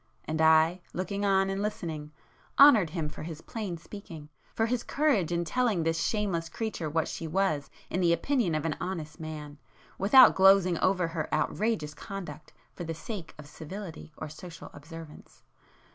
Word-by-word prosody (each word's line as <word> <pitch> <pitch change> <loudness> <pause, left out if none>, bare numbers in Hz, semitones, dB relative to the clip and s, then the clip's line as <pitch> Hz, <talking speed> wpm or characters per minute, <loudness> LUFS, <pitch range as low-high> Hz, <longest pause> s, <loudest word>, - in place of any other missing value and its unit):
And 155 0 -2
I, 160 +3 +5
looking 200 +3 -3
on 195 -1 +3
and 195 +1 -2
listening, 160 -8 -4 0.5
honoured 235 - +8
him 160 -2 -3
for 150 - -8
his 160 0 -7
plain 205 -7 -5
speaking, 165 -4 -10 0.3
for 225 - +2
his 240 +1 0
courage 255 - +1
in 170 0 0
telling 220 -2 +1
this 165 0 0
shameless 190 -7 -1
creature 215 -8 -3
what 160 +1 0
she 165 - -5
was 155 -5 0 0.2
in 185 - -2
the 170 -1 +4
opinion 180 - +1
of 155 0 -2
an 160 - 0
honest 165 -4 -5
man, 150 -2 -7 0.4
without 235 +7 +8
glozing 190 -2 +5
over 185 -3 +2
her 165 -2 -4
outrageous 155 +1 0
conduct 170 -6 -8 0.2
for - - -7
the 165 -1 -4
sake 180 -1 -7
of 150 - -10
civility 160 +3 -8
or 155 - -5
social 165 +2 -10
observance. 160 +1 -12
170 Hz, 165 wpm, -29 LUFS, 155-195 Hz, 0.5 s, honoured